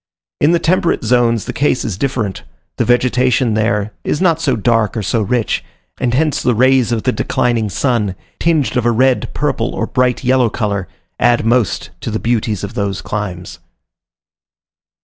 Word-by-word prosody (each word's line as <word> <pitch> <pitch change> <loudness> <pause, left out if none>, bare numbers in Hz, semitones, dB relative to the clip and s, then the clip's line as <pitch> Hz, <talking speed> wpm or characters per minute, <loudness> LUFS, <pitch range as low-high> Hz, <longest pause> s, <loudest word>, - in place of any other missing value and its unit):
In 150 - +4
the 170 - +4
temperate 170 0 +1
zones 120 -3 +2
the - - -5
case 140 -2 0
is 105 - -3
different 115 -3 -2 0.4
the 120 - +1
vegetation 125 0 +2
there 105 -1 0
is - - -1
not 170 -3 +2
so 135 -6 +1
dark 115 0 +1
or 110 - -2
so 115 +4 0
rich, 115 +2 -1 0.4
and 125 -1 0
hence 155 +1 +1
the 125 - +1
rays 130 0 +3
of 115 -2 -1
the 130 - +2
declining 120 -3 0
sun, 105 -3 0 0.2
tinged 160 -5 +1
of 120 -1 +1
a - - +4
red, 130 +2 +2
purple, - - -1
or - - -1
bright 125 0 0
yellow 125 -1 +3
color, 100 -4 -2 0.3
add 120 -2 +3
most 120 -2 +1
to - - -5
the 110 - -1
beauties 110 -3 -1
of 100 +2 -5
those 100 -3 -2
climes. 95 -4 -5
120 Hz, 170 wpm, -16 LUFS, 110-130 Hz, 0.4 s, In